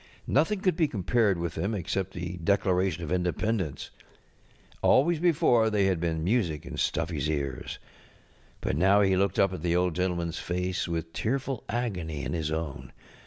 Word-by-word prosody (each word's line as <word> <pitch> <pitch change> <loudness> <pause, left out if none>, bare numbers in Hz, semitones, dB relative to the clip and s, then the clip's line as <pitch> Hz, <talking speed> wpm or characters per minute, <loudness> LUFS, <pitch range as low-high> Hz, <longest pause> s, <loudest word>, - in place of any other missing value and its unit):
Nothing 175 +8 +2
could 185 -3 +2
be 165 -3 +2
compared 105 -2 +1
with 85 -1 -3
them 105 +3 -2
except 95 0 -2
the 90 0 -5
Declaration 90 -1 +1
of 80 - -5
Independence, 90 -1 -1 0.9
Always 160 +4 +4
before 140 -9 +3
they 105 -2 +2
had 95 -3 +1
been 80 -1 -1
music 90 -6 0
in - - -8
StuffyŌĆÖs 80 -3 -1
ears. 70 -5 -3 0.8
But - - -1
now 95 +6 +4
he 95 -1 +3
looked 95 0 +1
up 95 -1 +3
at 90 - -5
the 85 0 +1
Old 90 -1 +2
GentlemanŌĆÖs 85 -1 -1
face 90 +1 -2
with 80 -1 -4
tearful 135 +1 -2
agony 90 - -2
in 65 - -3
his 80 -2 -2
own. 75 -5 -4
90 Hz, 165 wpm, -28 LUFS, 80-105 Hz, 0.9 s, Always